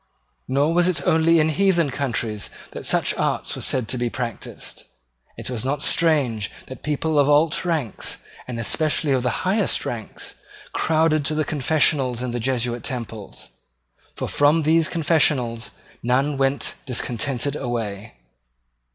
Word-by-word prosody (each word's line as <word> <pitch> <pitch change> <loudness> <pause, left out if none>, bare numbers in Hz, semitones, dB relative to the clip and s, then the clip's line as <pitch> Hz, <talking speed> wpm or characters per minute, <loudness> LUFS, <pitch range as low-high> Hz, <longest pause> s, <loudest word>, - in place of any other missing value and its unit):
Nor 145 +5 +2
was 175 +1 +4
it 155 -6 0
only 165 +1 +4
in 155 0 +3
heathen 170 -3 +2
countries 120 -6 -2 0.2
that - - -5
such - - +2
arts - - 0
were - - -6
said 125 -4 +1
to 125 0 -1
be 120 0 0
practised. 120 -3 -6 0.5
It - - -3
was 120 -3 -3
not 135 +2 -1
strange 135 -11 +2 0.2
that 130 - -10
people 150 +1 0
of 140 0 +4
alt 150 +3 +3
ranks, 160 - -2 0.3
and 120 -2 -4
especially 150 +5 +1
of 130 -2 +3
the 125 - -1
highest 195 +1 +1
ranks, 115 -3 -5 0.4
crowded 155 -1 +2
to 155 - -1
the 155 -1 +1
confessionals 135 -4 +1
in 125 - -2
the 120 - -2
Jesuit 120 -1 -1
temples; 115 -5 -5 0.7
for - - -3
from 150 +3 +3
those 160 +1 +4
confessionals 145 -8 +1 0.3
none 135 +4 +1
went 135 +1 0
discontented 125 +2 -1
away. 115 -5 -4
140 Hz, 145 wpm, -23 LUFS, 120-155 Hz, 0.7 s, was